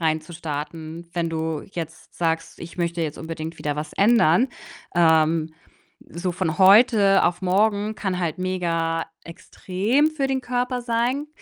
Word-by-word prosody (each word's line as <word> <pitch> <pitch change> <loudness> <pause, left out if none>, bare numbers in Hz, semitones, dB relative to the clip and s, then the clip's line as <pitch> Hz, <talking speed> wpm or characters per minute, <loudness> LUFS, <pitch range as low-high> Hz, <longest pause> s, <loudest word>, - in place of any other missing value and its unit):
rein 160 -1 +1
zu 155 +3 -13
starten. 160 +1 -6
Wenn 170 -1 -1
du 160 -1 -3
jetzt 165 -1 -7
sagst: 165 -1 -2
„Ich 170 - -9
möchte 170 -1 -2
jetzt 155 -2 -4
unbedingt 160 0 -6
wieder 145 -1 -2
was 150 +1 -5
ändern.“ 210 0 +4 0.5
Ähm, 160 -1 +3 0.6
so 175 +1 -3
von 175 -2 -2
heute 200 0 +6
auf 175 +1 0
morgen 205 +3 +1
kann 190 -4 -3
halt 170 -3 -2
mega 165 -3 -1 0.2
extrem 200 - -1
für 295 -3 -1
den 265 -1 0
Körper 250 0 -2
sein. 240 +5 -1
175 Hz, 145 wpm, -23 LUFS, 160-205 Hz, 0.6 s, heute